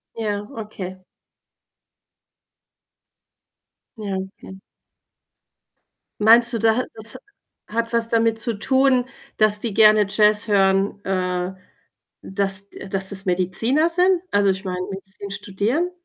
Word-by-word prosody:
Ja, 210 -2 -3
okay. 190 -4 -8 2.9
Ja, 200 -3 -4 0.3
hm. 190 0 -11 1.6
Meinst 230 +3 +6
du, 230 - 0
da 225 +1 +2
hat 250 - -1
das 220 0 +1
ha - - -8 0.5
hat 230 +2 -3
was 230 0 +1
damit 230 -1 +1
zu 225 -2 +1
tun, 260 +1 +2 0.3
dass 215 -1 +5
die 225 -1 -4
gerne 215 -1 +5
Jazz 210 +1 +3
hören, 195 0 +1
äh, 185 -1 -2 0.7
dass, 195 0 -3
d - - -14
äh 195 - -8
dass 190 0 -2
das 195 -1 -3
Mediziner 195 - +1
sind? 360 +1 +2
Also, 200 -1 +3
ich 190 +1 -4
meine, 180 -1 -4
Medizin 195 +1 -9
studieren? 205 - -2
210 Hz, 125 wpm, -21 LUFS, 195-230 Hz, 2.9 s, Meinst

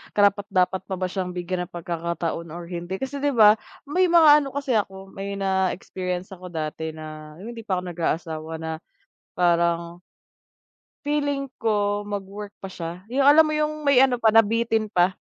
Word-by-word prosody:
karapat-dapat 200 -2 +2
pa 190 - -3
ba 185 0 -2
siyang 180 -2 -3
bigyan 180 0 -3
ng - - -44
pagkakataon 170 0 -3
or 175 - -6
hindi. 175 +1 -4
Kasi 265 +6 -4
'di 285 -2 0
'ba 215 -1 +7 0.3
may 360 +6 +2
mga 335 -3 +7
ano 275 - -5
kasi 280 -2 -2
ako 195 -1 -4
may 200 +1 -5
na-experience 190 -1 -2
ako 185 -1 -9
dati 160 -1 -4
na 155 -1 -9
'yung 230 +3 -7
hindi 230 -1 -9
pa 185 -2 +1
ako - - -8
nag-aasawa 160 -1 -3
na 160 0 -3 0.6
parang, 170 0 +1 1.0
feeling 285 -2 -1
ko 205 -2 0
magwo-work 205 0 -6
pa 195 - -6
siya, 170 -1 -6
'yung 270 +3 +1
alam 295 +3 +8
mo 305 - -1
'yung 305 -1 -2
may 265 -2 +6
ano 250 -2 +1
pa, 225 - +4
nabitin 225 -1 +3
pa. 175 0 +4
195 Hz, 170 wpm, -24 LUFS, 175-230 Hz, 1.0 s, alam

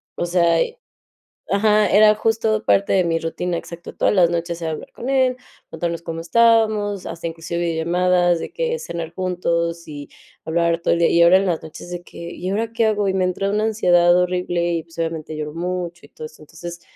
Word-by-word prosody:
o - - -2
sea, 170 -1 +2
y 475 - -3 0.8
Ajá, 210 +1 +3
era 215 +1 +6
justo 220 0 0
parte 200 - +2
de 190 - +4
mi 165 -1 0
rutina, 170 +2 -3
exacto, 170 +1 -9
todas - - +1
las 175 -3 +4
noches 170 0 -3
era 160 - -2
hablar 155 - -8
con 250 - -5
él, 260 -2 +2 0.3
contarnos 170 0 -3
cómo 165 -1 -5
estábamos, 215 +1 +2
hasta 170 - -6
inclusive 170 +1 -3
llamadas 175 +1 +2
de - - -6
que 475 +2 -2
cenar 170 - -6
juntos 170 -2 -2
y 145 -2 -8 0.4
hablar 170 +1 +1
todo - - +2
el 170 - -2
día. 170 - +4
Y 170 - +4
ahora 180 +2 +7
en 195 - -1
las 170 -3 0
noches 160 +2 -10
de 175 0 -6
que, - - -14 0.2
¿y 180 - -5
ahora 225 +3 -2
qué 230 -1 +1
hago? 210 -2 +1
Y 190 - 0
me 190 -1 +1
entra 185 +2 -1
una 210 +1 0
ansiedad 175 -5 +4
horrible 180 -1 0
y, 165 -1 -3
pues, 165 0 -19
obviamente, 160 -1 -4
lloro 150 0 -5
mucho 175 -2 -4
y - - -27
todo 155 - -8
eso. 155 - -16
Entonces, 170 +2 -9
175 Hz, 210 wpm, -21 LUFS, 170-205 Hz, 0.8 s, ahora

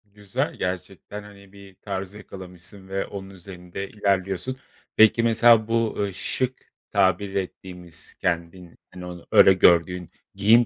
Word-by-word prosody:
Güzel, 105 +7 -3
gerçekten 95 +3 -5
hani, 100 -1 -15
bir 100 -1 -14
tarz 95 0 -5
yakalamışsın 95 -1 -11
ve 95 0 -2
onun 95 -1 -8
üzerinde 95 0 -8
ilerliyorsun. 100 +4 -1 0.4
Peki, 110 +1 +6
mesela 115 -1 +5
bu, 115 -1 +1
ııı, 100 -1 -1
şık 130 +6 -3 0.2
tabir 95 0 +2
ettiğimiz 90 -3 -5
kendin 85 0 -3 0.2
hani, 90 -1 -9
onu 90 -1 -9
öyle 95 - +8
gördüğün 90 -1 +3 0.2
giyim 110 +5 +5
95 Hz, 130 wpm, -24 LUFS, 90-105 Hz, 0.4 s, öyle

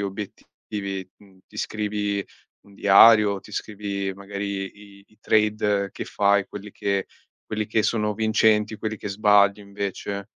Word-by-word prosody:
obiettivi? 100 -1 -6
Mhmm, 95 -2 -21
ti 105 - -15
scrivi 105 -2 -2 0.4
un 100 - -20
diario, 100 0 +6
ti 105 - -15
scrivi 100 -2 -4
magari 100 0 -5 0.3
i - - -23
i 110 - -27
trade 105 -2 +1
che - - -6
fai, 100 -1 +2
quelli 105 0 -9
che 100 -1 -1 0.4
quelli 110 -1 -3
che 110 +1 +1
sono 105 -2 0
vincenti, 110 0 +2
quelli 110 0 -4
che 105 - -6
sbagli 100 0 +4
invece? 100 0 -5
100 Hz, 140 wpm, -24 LUFS, 100-105 Hz, 0.4 s, diario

